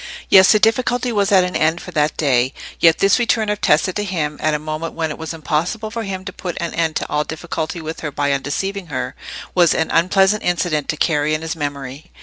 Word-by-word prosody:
Yes, 190 -1 +7
the 215 - +6
difficulty 245 +2 +1
was 205 -2 +1
at 190 -2 +6
an 180 0 -3
end 160 +2 +2
for 180 - -9
that 150 -2 0
day; 130 -3 +1 0.2
yet 165 -1 +5
this 195 +5 +3
return 225 -2 +1
of 210 0 -2
Tessa 160 +5 +3
to 210 - -2
him, 160 -7 -2
at 155 -1 +1
a - - +1
moment 155 +2 -5
when 160 -2 -2
it - - -6
was 160 -1 -5
impossible 170 +7 -2
for 230 0 -4
him 190 -3 -5
to 185 - -6
put 180 -1 -6
an 170 -1 -3
end 160 -2 0
to - - -2
all 150 0 0
difficulty 160 +1 -5
with 160 +1 -6
her 150 - -4
by 145 0 0
undeceiving 185 +8 -2
her, 130 -4 -4 0.4
was 175 -3 +4
an 160 - 0
unpleasant 190 +4 +3
incident 175 -4 -1
to 155 - -1
carry 150 -1 +1
in 155 - -5
his 160 0 -3
memory. 145 +1 -6
165 Hz, 230 wpm, -19 LUFS, 150-190 Hz, 0.4 s, Yes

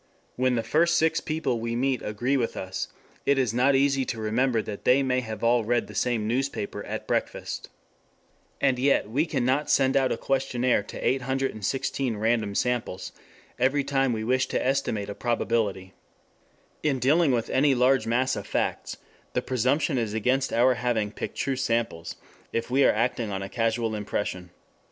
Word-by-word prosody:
When 130 0 +1
the 115 - 0
first 165 +8 +3
six 160 0 +2
people 155 -7 -1
we 115 +1 -3
meet 130 0 0
agree 120 +6 -1
with 120 -4 -1
us, 95 0 -4 0.4
it 140 - +2
is 125 -5 +1
not 130 +3 +3
easy 135 0 +3
to 115 - -4
remember 115 +3 +1
that 105 -1 -7
they 130 +2 +4
may 130 -1 0
all 115 +3 +2
have 110 - -5
read 120 0 +1
the - - -12
same 115 -4 0
newspaper 120 -4 -2
at - - -4
breakfast. - - -3 0.9
And 130 -3 +2
yet 140 -4 +2
we 150 +7 +1
cannot 135 +1 0
send 135 -2 +3
out 135 -1 +3
a - - 0
questionnaire 130 -3 +1
to 100 - -5
816 130 -2 -1
random 110 -2 0
samples 115 -7 -1 0.5
every 135 +3 +2
time 135 -2 +1
we 110 -2 -2
wish 130 +3 +1
to - - -1
estimate 130 -6 0
a 100 - -5
probability. 110 -5 -1 0.9
In 145 -3 +1
dealing 145 +5 +3
with 120 -3 -1
any 135 +1 +3
large 125 -2 +3
mass 130 +3 +1
of 105 - -6
facts, - - -2 0.4
the - - +1
presumption 130 +3 +1
is 110 -2 -2
against 130 +5 +1
our 125 +2 +4
having 115 -3 -1
picked - - -6
true 135 - 0
samples, 115 -10 -2 0.4
if 115 +1 -3
we 135 +2 +4
are - - +6
acting 115 0 -1
on 95 -1 -3
a 95 - -6
casual 115 0 0
impression. 100 -3 -3
125 Hz, 175 wpm, -26 LUFS, 110-135 Hz, 0.9 s, are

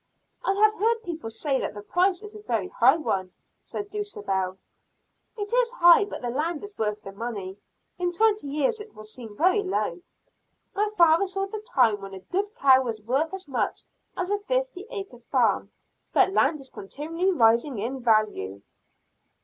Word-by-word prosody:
"I 390 - +2
have 425 +2 +4
heard 455 +2 +1
people 325 - -5
say 270 +4 -1
the 205 0 -4
price 365 - +1
is 420 0 -9
a 425 - -9
very 225 - -2
high 260 +6 +4
one," 190 - -2 0.3
said 410 0 -6
Dulcibel. 195 - -2 0.8
"It 410 +1 -4
is - - +3
high 345 -3 +7
but 410 - -8
the 240 - -1
land 305 +4 -2
is 410 0 -9
worth 210 -1 -2
the 195 - -8
money. 200 -3 -6 0.4
In 355 0 0
twenty 420 -2 +2
years 295 - 0
it 425 0 -10
will 215 - -10
seem 215 -1 -9
very 370 +5 +4
low. 350 - -2 0.7
My 415 +1 +1
father 335 +3 +5
saw 390 +1 -2
the 425 +2 -6 0.2
time 225 -6 +4
when 195 0 -8
a - - -8
good 405 - -3
cow 265 - +6
was 230 -4 -3
worth 265 +9 0
as 385 -2 -7
much 240 -7 -2 0.3
as 365 +2 -2
a 410 - +1
fifty - - -2
acre 390 - -7
farm, 245 0 +1 0.4
but 385 - +4
land 305 -3 +3
is 270 -1 -8
continually 325 - -2
rising 235 - +3
in 245 +6 -3
value." 210 - +1
305 Hz, 175 wpm, -26 LUFS, -, 0.8 s, high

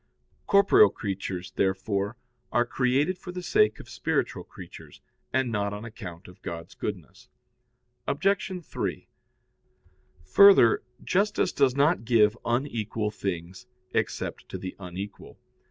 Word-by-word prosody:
Corporeal 200 +1 +6
creatures, 95 -4 -5
therefore, 100 +3 -1 0.3
are 120 0 +3
created 135 +9 +1
for 180 - -8
the 180 0 -6
sake 425 - +3
of - - -11
spiritual - - -2
creatures, - - -12 0.3
and 130 -2 +1
not 100 -2 -1
on 105 +2 -6
account 95 -7 -9
of 90 - -15
God's 85 -1 -7
goodness. - - -7 0.8
Obj. 190 +5 +1
3: - - -4 1.2
Further, 190 - +7 0.2
justice 205 +3 +1
does 135 -3 +2
not 145 0 +3
give 110 -2 +4
unequal 115 -4 -1
things 95 +2 -5 0.3
except - - -2
to - - -5
the 95 - -7
unequal. 95 +2 -8
115 Hz, 120 wpm, -27 LUFS, 100-145 Hz, 1.2 s, Further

